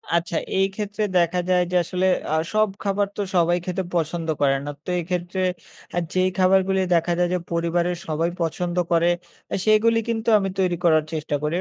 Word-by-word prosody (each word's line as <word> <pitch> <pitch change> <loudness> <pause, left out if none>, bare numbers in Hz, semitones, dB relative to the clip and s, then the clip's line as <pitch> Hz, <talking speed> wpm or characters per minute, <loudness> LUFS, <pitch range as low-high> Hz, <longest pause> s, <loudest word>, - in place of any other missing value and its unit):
আচ্ছা। 170 -1 0 0.2
এই 195 - +4
ক্ষেত্রে 210 0 -3
দেখা 175 +1 +2
যায় 180 -1 +4
যে - - -1
আসলে 180 +2 -1 0.3
আ - - +3 0.2
সব 215 -1 +3
খাবার 200 0 +1
তো 205 - -1
সবাই 175 0 +3
খেতে 185 +1 -2
পছন্দ 165 0 -1
করে 135 -1 +4
না। 145 - -3
তো - - -8
এক্ষেত্রে 180 +2 -3 0.5
অ্যা 175 - 0
যেই 185 0 +2
খাবারগুলি 190 +1 +3
দেখা 170 +1 +1
যায় 175 - +3
যে - - +2
পরিবারের 170 +1 0
সবাই 160 +2 0
পছন্দ 175 +2 -2 0.2
করে 170 0 +4 0.4
অ্যা - - -1
সেগুলো 220 +1 +4
কিন্তু 225 0 -1
আমি 195 -1 -1
তৈরি 180 -2 +2
করার 155 -2 +4
চেষ্টা 155 -2 -2
করি। 150 +1 -1
175 Hz, 185 wpm, -23 LUFS, 170-190 Hz, 0.5 s, এই